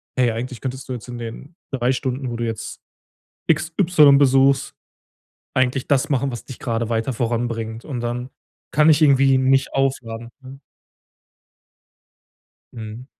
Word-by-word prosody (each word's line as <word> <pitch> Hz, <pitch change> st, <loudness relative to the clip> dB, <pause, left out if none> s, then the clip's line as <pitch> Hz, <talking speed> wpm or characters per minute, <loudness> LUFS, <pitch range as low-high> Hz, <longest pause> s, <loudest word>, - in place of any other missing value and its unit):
„Hey, 125 Hz, -3 st, +2 dB
eigentlich 120 Hz, +2 st, -5 dB
könntest 130 Hz, 0 st, -5 dB
du 130 Hz, -, -4 dB
jetzt 125 Hz, 0 st, -8 dB
in 120 Hz, -1 st, -7 dB
den 120 Hz, +7 st, -8 dB, 0.2 s
3 125 Hz, -1 st, +1 dB
Stunden, 130 Hz, 0 st, -3 dB
wo 120 Hz, -, -4 dB
du 120 Hz, 0 st, -2 dB
jetzt 115 Hz, -1 st, -5 dB, 0.7 s
XY 160 Hz, -2 st, +4 dB
besuchst, 135 Hz, 0 st, +3 dB, 0.8 s
eigentlich 130 Hz, 0 st, 0 dB
das 135 Hz, -2 st, +1 dB
machen, 135 Hz, -1 st, 0 dB
was 120 Hz, -, -7 dB
dich 130 Hz, -, -9 dB
gerade 115 Hz, -2 st, -2 dB
weiter 115 Hz, +2 st, -1 dB
voranbringt“, 115 Hz, -1 st, -3 dB
und 130 Hz, -5 st, -4 dB
dann 120 Hz, +2 st, -4 dB, 0.4 s
kann 150 Hz, +2 st, +4 dB
ich 155 Hz, 0 st, +5 dB
irgendwie 135 Hz, -2 st, +5 dB
nicht 135 Hz, +1 st, +2 dB
aufladen, 120 Hz, -4 st, -2 dB
ne? 135 Hz, +1 st, -12 dB, 2.1 s
Mhm. 110 Hz, +2 st, -8 dB
130 Hz, 140 wpm, -21 LUFS, 120-135 Hz, 2.1 s, ich